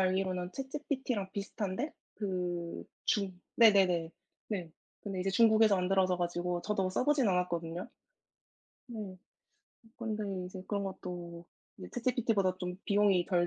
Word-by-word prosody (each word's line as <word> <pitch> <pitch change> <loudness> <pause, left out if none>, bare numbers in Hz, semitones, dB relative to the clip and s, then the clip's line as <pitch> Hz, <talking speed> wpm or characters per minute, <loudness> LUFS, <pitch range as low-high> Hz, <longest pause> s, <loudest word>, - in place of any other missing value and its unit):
알기로는 185 -1 +1
ChatGPT랑 265 -7 -2
비슷한데 205 +6 -3 0.2
그 180 -4 -3 0.3
중 190 -4 0 0.2
네네네. 190 -7 +6 0.4
네. 180 -6 -2 0.3
근데 195 -3 -4
이제 195 +1 0
중국에서 220 0 +6
만들어져 185 0 +2
가지고 175 0 -1
저도 195 -2 0
써 195 - 0
보진 290 -4 +4
않았거든요. 175 -2 0 1.0
네. 210 -5 -6 0.8
근데 220 -3 -2 0.2
이제 185 +1 -7
그런 200 -1 0
것도 175 -2 -6 0.3
이제 185 - -8
ChatGPT보다 225 -6 +1
좀 180 -1 -3
비용이 200 -3 +4
덜 175 -3 +2
190 Hz, 320 characters per minute, -32 LUFS, 180-215 Hz, 1.0 s, 네네네